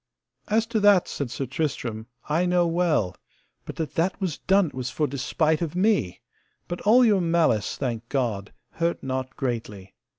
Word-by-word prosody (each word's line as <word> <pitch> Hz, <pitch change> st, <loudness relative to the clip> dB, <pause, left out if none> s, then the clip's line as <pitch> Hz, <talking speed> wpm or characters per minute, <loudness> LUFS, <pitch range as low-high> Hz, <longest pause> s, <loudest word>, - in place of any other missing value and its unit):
As 220 Hz, +2 st, +2 dB
to 220 Hz, -, +3 dB
that, 205 Hz, -3 st, +5 dB
said 140 Hz, -4 st, -4 dB
Sir 120 Hz, +3 st, -3 dB
Tristram, 120 Hz, -5 st, -3 dB, 0.2 s
I 165 Hz, +4 st, +1 dB
know 180 Hz, -1 st, +3 dB
well; 165 Hz, -, +1 dB, 0.5 s
but -, -, -7 dB
that 155 Hz, -3 st, -4 dB
that 170 Hz, +4 st, 0 dB
was 185 Hz, -6 st, -2 dB
done 195 Hz, +1 st, +3 dB
it -, -, -20 dB
was 125 Hz, -1 st, -4 dB
for 150 Hz, +3 st, 0 dB
despite 150 Hz, +4 st, 0 dB
of 165 Hz, -1 st, -3 dB
me, 190 Hz, -, +1 dB, 0.5 s
but 175 Hz, -, -5 dB
all 245 Hz, +4 st, +6 dB
your 205 Hz, -4 st, +4 dB
malice, 165 Hz, -, +1 dB
I -, -, -27 dB
thank 120 Hz, -4 st, -3 dB
God, 115 Hz, -7 st, -2 dB, 0.2 s
hurt 170 Hz, 0 st, -2 dB
not 130 Hz, 0 st, -3 dB
greatly. 115 Hz, -7 st, -4 dB
155 Hz, 175 wpm, -25 LUFS, 125-180 Hz, 0.5 s, all